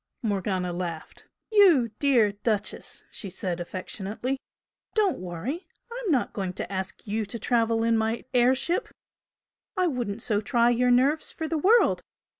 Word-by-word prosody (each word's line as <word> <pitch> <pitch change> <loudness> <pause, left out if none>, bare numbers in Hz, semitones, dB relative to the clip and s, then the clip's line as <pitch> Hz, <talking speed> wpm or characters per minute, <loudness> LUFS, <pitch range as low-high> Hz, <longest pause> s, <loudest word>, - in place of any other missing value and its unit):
Morgana 190 -4 -1
laughed. 170 -2 -6 0.2
"You 345 - +6
dear 245 -8 +4
Duchess!" 205 0 -2
she 200 - -6
said, 180 -1 -3
affectionately 200 +8 -4 0.6
"Don't 415 -5 +2
worry! 185 - -5 0.2
I'm 475 -5 -2
not 265 -5 +1
going 190 -3 -3
to 185 - -5
ask 190 0 -4
you 215 +1 -1
to 205 +4 -4
travel 230 0 +1
in 230 0 +3
my 220 +1 -1
air 250 +1 +5
ship 340 - -1 0.9
I 365 - +3
wouldn't 240 - -2
so 210 -2 +1
try 240 +1 +3
your 250 +1 +2
nerves 270 +6 +3
for 320 - -4
the 320 -1 -1
world! 445 +9 +4
230 Hz, 150 wpm, -26 LUFS, 200-275 Hz, 0.9 s, You